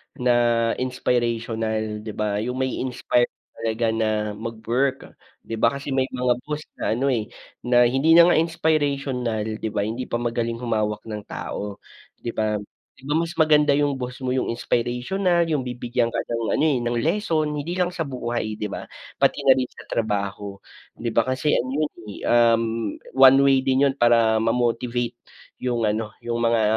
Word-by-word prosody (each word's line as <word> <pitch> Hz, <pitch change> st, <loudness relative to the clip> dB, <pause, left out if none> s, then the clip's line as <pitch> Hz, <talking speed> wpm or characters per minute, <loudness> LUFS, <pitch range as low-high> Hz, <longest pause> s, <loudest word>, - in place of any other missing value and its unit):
na 120 Hz, -2 st, +2 dB
inspirational 115 Hz, -4 st, -1 dB
'di 105 Hz, -1 st, -7 dB
ba? 105 Hz, -1 st, -1 dB
Yung 125 Hz, +3 st, -3 dB
mai-inspire 130 Hz, -1 st, 0 dB, 0.2 s
talaga 115 Hz, 0 st, -2 dB
na 110 Hz, -1 st, 0 dB, 0.3 s
mag 115 Hz, +1 st, -5 dB
work. 130 Hz, +4 st, -1 dB, 0.3 s
Di 115 Hz, -, -5 dB
ba, 115 Hz, +4 st, +3 dB
kasi 140 Hz, +1 st, -6 dB
may 130 Hz, 0 st, +1 dB
mga 125 Hz, -1 st, +1 dB
boss 150 Hz, 0 st, -3 dB, 0.2 s
na -, -, 0 dB
ano, 135 Hz, +3 st, +1 dB
eh, 115 Hz, -4 st, 0 dB, 0.4 s
na 120 Hz, 0 st, +5 dB
hindi 135 Hz, +7 st, +4 dB
na 170 Hz, +1 st, +8 dB
nga -, -, +4 dB
inspirational, 140 Hz, -8 st, 0 dB, 0.2 s
'di 110 Hz, -, -3 dB
ba, 100 Hz, -, -1 dB
hindi 115 Hz, +4 st, -4 dB
pa -, -, -3 dB
magaling 115 Hz, -1 st, -1 dB
humawak 110 Hz, -3 st, -2 dB
ng 105 Hz, -2 st, -7 dB
tao, 100 Hz, -1 st, -6 dB, 0.3 s
'di 115 Hz, -, -5 dB
ba? 110 Hz, -1 st, 0 dB, 0.4 s
Di -, -, -19 dB
ba 145 Hz, -, -1 dB
mas 165 Hz, 0 st, 0 dB
maganda 150 Hz, -2 st, +4 dB
yung 145 Hz, -1 st, +2 dB
boss 125 Hz, -1 st, -5 dB
mo, 125 Hz, -, 0 dB
yung 130 Hz, -, 0 dB
inspirational. 125 Hz, +11 st, 0 dB
Yung 150 Hz, -3 st, +1 dB
bibigyan 120 Hz, -1 st, -1 dB
ka -, -, -1 dB
ng 115 Hz, -1 st, -2 dB
ano, 155 Hz, -, +2 dB
eh, 140 Hz, -5 st, +2 dB
ng 120 Hz, 0 st, -1 dB
lesson. 160 Hz, -, +1 dB
Hindi 150 Hz, +3 st, -3 dB
lang 180 Hz, -1 st, +1 dB
sa 175 Hz, -, -4 dB
buhay 120 Hz, -4 st, -3 dB
'di 105 Hz, -, -3 dB
ba, -, -, -6 dB, 0.4 s
pati -, -, +3 dB
na 135 Hz, -, +8 dB
rin 130 Hz, -1 st, -1 dB
sa -, -, -13 dB
trabaho 100 Hz, -2 st, -2 dB, 0.4 s
'di 115 Hz, -, -3 dB
ba? 115 Hz, -, +4 dB
Kasi 130 Hz, +3 st, -1 dB
ano 130 Hz, -, 0 dB
yun, 150 Hz, -, -1 dB, 0.2 s
eh, -, -, -10 dB
um, 115 Hz, -1 st, +5 dB, 0.5 s
one 135 Hz, 0 st, +8 dB
way 135 Hz, -1 st, +5 dB
din 135 Hz, +1 st, +3 dB
yun 135 Hz, -, -2 dB
para 115 Hz, -2 st, +4 dB
ma-motivate 120 Hz, +1 st, 0 dB, 0.5 s
yung 120 Hz, -2 st, -1 dB
ano, 105 Hz, +1 st, -1 dB, 0.2 s
yung 120 Hz, 0 st, -1 dB
mga, 115 Hz, -1 st, +3 dB
120 Hz, 175 wpm, -23 LUFS, 115-135 Hz, 0.5 s, na